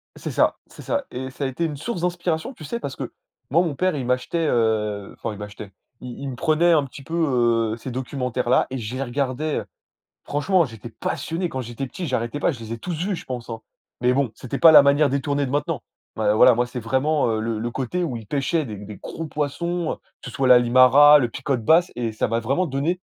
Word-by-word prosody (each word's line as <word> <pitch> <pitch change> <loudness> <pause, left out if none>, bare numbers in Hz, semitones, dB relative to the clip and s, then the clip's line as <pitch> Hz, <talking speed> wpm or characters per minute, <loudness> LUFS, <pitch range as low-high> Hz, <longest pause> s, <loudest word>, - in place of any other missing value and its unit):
C'est - - -6
ça, - - +2
c'est - - -13
ça 285 -1 -1
et 130 +1 -6
ça 140 - -6
a - - +1
été 150 +6 -2
une 150 -2 -3
source 175 +4 -4
d'inspiration, 175 +4 -1
tu 155 - -13
sais? 235 +11 -4
Parce 140 - -5
que - - -6 0.4
moi, 165 +6 +4
mon 160 -4 -2
père, 185 -1 +1
il 130 -3 -3
m'achetait, 130 +6 0
heu, 105 -4 0
enfin 115 - -4
il 105 - -10
m'achetait, 105 -1 -8 0.3
i 125 -1 -7
il 140 - -4
me 125 - -5
prenait 165 +5 +3
un 150 -4 +4
petit 140 +1 -11
peu, 165 +5 -6 0.6
heu, - - -5
ces 130 - -7
documentaires-là 125 -1 0
et 130 - -4
je 115 +2 -5
les 135 - -3
regardais. 135 +3 -2
Heu, - - -11 0.6
franchement, 170 +5 +2
j'étais 115 -3 -8
passionné 165 +9 -3
quand 130 - -4
j'étais 120 +3 -5
petit, 170 +6 -6
j'arrêtais 125 +2 -2
pas. 160 - +1
Je 120 - -10
les 110 0 -8
ai 115 - -3
tous 175 +8 -5
vus, 190 +5 -2
je - - -10
pense, 125 -2 -6
hein. 115 -1 -5 0.4
Mais 125 +1 +3
bon, 135 -4 +1
c'était 130 +4 -6
pas 165 - +8
la 150 - +10
manière 140 +1 +4
détournée 140 +1 0
de 130 - -5
maintenant. 145 -2 -1 0.3
Ouais, 105 -1 +2
voilà, 125 +2 +6
moi, 120 +1 +1
c'est 125 0 -6
vraiment, 130 +5 +1
heu, 110 -1 0
le 110 -1 -2
le 120 +1 -3
côté 135 +9 -2
où 130 -6 -4
il 110 -2 -7
pêchait 150 +6 0
des 105 -3 -7
des 105 +1 -9
gros 165 - -6
poissons, 165 +4 -2
heu, - - -6 0.3
que 125 - -8
ce - - -11
soit 130 +1 0
la 125 -1 +8
limara, 130 +5 +7
le 120 - +1
picote 130 -2 -2
basse 175 +5 +4
et 115 -2 -2
ça 110 - -1
m'a 115 0 +1
vraiment 135 +10 0
donné 155 +7 -1
135 Hz, 245 wpm, -23 LUFS, 120-155 Hz, 0.6 s, la